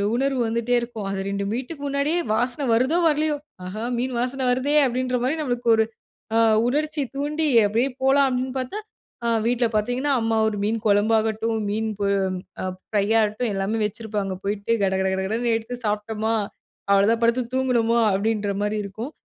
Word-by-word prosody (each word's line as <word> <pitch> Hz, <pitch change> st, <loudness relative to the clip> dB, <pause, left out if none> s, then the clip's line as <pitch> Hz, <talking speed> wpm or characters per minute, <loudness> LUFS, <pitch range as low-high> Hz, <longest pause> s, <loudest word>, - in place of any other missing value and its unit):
உணர்வு 270 Hz, 0 st, 0 dB
வந்துட்டே 235 Hz, +2 st, -1 dB
இருக்கும். 230 Hz, -4 st, -6 dB
அது 195 Hz, 0 st, -3 dB
2 200 Hz, 0 st, -2 dB
வீட்டுக்கு 275 Hz, +5 st, -5 dB
முன்னாடியே 280 Hz, +5 st, 0 dB
வாசனை 245 Hz, +5 st, 0 dB
வருதோ, 260 Hz, +9 st, +2 dB
வரலையோ, 305 Hz, 0 st, +1 dB, 0.3 s
ஆஹா! 215 Hz, +5 st, -5 dB
மீன் 255 Hz, +1 st, -2 dB
வாசனை 255 Hz, +2 st, -2 dB
வருதே 260 Hz, +4 st, +1 dB
அப்படின்ற 255 Hz, 0 st, 0 dB
மாரி 270 Hz, +5 st, +1 dB
நம்மளுக்கு 245 Hz, -4 st, -1 dB
ஒரு 220 Hz, -, +4 dB, 0.5 s
அ -, -, +5 dB, 0.3 s
உணர்ச்சி 300 Hz, +3 st, 0 dB
தூண்டி, 300 Hz, +2 st, -1 dB, 0.2 s
அப்படியே 230 Hz, +6 st, +1 dB
போலாம் 275 Hz, +1 st, +4 dB
அப்படின்னு 255 Hz, +1 st, -2 dB
பார்த்தா, 260 Hz, +12 st, -3 dB, 0.5 s
அ -, -, +2 dB, 0.2 s
வீட்ல 240 Hz, 0 st, +2 dB
பார்த்தீங்கன்னா, 245 Hz, +7 st, 0 dB
அம்மா 225 Hz, 0 st, +1 dB
ஒரு 210 Hz, -1 st, -2 dB
மீன் 220 Hz, +2 st, 0 dB
குழம்பு 205 Hz, +2 st, +3 dB
ஆகட்டும், 220 Hz, +1 st, -1 dB
மீன் 220 Hz, +1 st, -1 dB
பொ 200 Hz, -, 0 dB, 0.6 s
அ -, -, -2 dB, 0.2 s
ஃப்ரையாகட்டும் 215 Hz, +2 st, +1 dB
எல்லாமே 195 Hz, +3 st, -1 dB
வச்சிருப்பாங்க. 210 Hz, -3 st, -3 dB
போயிட்டு 205 Hz, +2 st, -2 dB
கடகடகடன்னு 190 Hz, +5 st, 0 dB
எடுத்து 235 Hz, +2 st, -6 dB
சாப்பிட்டோமா, 215 Hz, +1 st, -1 dB, 0.6 s
அவ்வளோதான் 210 Hz, +4 st, +4 dB
படுத்து 235 Hz, +2 st, +3 dB
தூங்குனோமா, 235 Hz, -3 st, +2 dB
அப்படின்ற 205 Hz, 0 st, 0 dB
மாரி 210 Hz, +1 st, -1 dB
இருக்கும். 220 Hz, +8 st, -6 dB
230 Hz, 155 wpm, -23 LUFS, 210-260 Hz, 0.6 s, அ